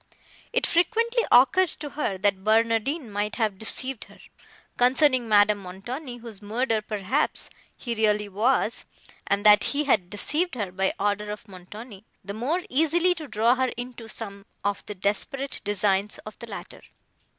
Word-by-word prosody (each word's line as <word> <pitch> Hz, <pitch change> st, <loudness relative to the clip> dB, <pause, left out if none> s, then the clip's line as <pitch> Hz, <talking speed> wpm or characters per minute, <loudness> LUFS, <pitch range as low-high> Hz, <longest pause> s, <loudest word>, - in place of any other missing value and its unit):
It -, -, +1 dB
frequently 460 Hz, +7 st, +2 dB
occurred 365 Hz, +9 st, +6 dB
to 295 Hz, -2 st, -6 dB
her, 205 Hz, -10 st, -2 dB
that 195 Hz, 0 st, 0 dB
Barnardine 230 Hz, +6 st, +2 dB
might 205 Hz, +1 st, -2 dB
have 215 Hz, -5 st, -1 dB
deceived 255 Hz, +2 st, -5 dB
her, -, -, -17 dB, 0.6 s
concerning 255 Hz, -1 st, +3 dB
Madame 205 Hz, 0 st, +5 dB
Montoni, 240 Hz, +8 st, -7 dB
whose 225 Hz, -4 st, -10 dB
murderer, 225 Hz, +2 st, 0 dB
perhaps, 210 Hz, +6 st, 0 dB, 0.3 s
he 235 Hz, -, -4 dB
really 210 Hz, -2 st, +1 dB
was; 225 Hz, +3 st, +1 dB, 0.4 s
and 200 Hz, +1 st, 0 dB
that 210 Hz, -1 st, +7 dB
he 290 Hz, +1 st, +2 dB
had 205 Hz, -11 st, +2 dB
deceived 300 Hz, -, -1 dB
her 205 Hz, -6 st, -3 dB
by 190 Hz, +1 st, 0 dB
order 205 Hz, +1 st, 0 dB
of 210 Hz, +1 st, -7 dB
Montoni, 200 Hz, +3 st, -11 dB, 0.2 s
the 200 Hz, -, -5 dB
more 270 Hz, -, -1 dB
easily 330 Hz, +6 st, +3 dB
to 320 Hz, -4 st, -8 dB
draw 225 Hz, +1 st, +3 dB
her 260 Hz, 0 st, 0 dB
into 245 Hz, -2 st, -7 dB
some 200 Hz, -3 st, -8 dB, 0.2 s
of 205 Hz, -1 st, -1 dB
the 210 Hz, -, -6 dB
desperate 210 Hz, +8 st, -2 dB
designs 205 Hz, 0 st, 0 dB
of 215 Hz, -, -10 dB
the 235 Hz, -, -8 dB
latter. 200 Hz, -, -9 dB
220 Hz, 155 wpm, -26 LUFS, 205-265 Hz, 0.6 s, that